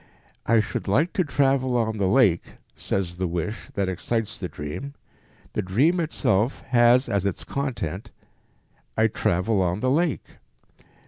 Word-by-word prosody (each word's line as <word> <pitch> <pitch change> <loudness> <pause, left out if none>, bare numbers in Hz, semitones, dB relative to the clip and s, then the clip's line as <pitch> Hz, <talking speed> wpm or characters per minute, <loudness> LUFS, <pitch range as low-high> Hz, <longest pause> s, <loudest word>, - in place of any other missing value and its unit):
"I 115 -1 +5
should - - -5
like 140 - +2
to 185 - +2
travel 135 -4 +1
on 110 -2 -1
the 95 - +2
lake," 95 -5 +3 0.2
says 90 -3 -3
the 90 0 -1
wish 85 +6 -4
that 100 -2 0
excites 100 +5 -2
the - - -3
dream; 75 - -6 0.6
the - - 0
dream 135 - +2
itself 125 - 0
has 120 +1 +5
as 100 -2 0
its 100 -3 -2
content 120 - -4 0.9
"I 110 - +4
travel 105 -1 +1
on 90 +1 0
the 130 - +2
lake." 160 +1 +1
110 Hz, 145 wpm, -24 LUFS, 95-135 Hz, 0.9 s, I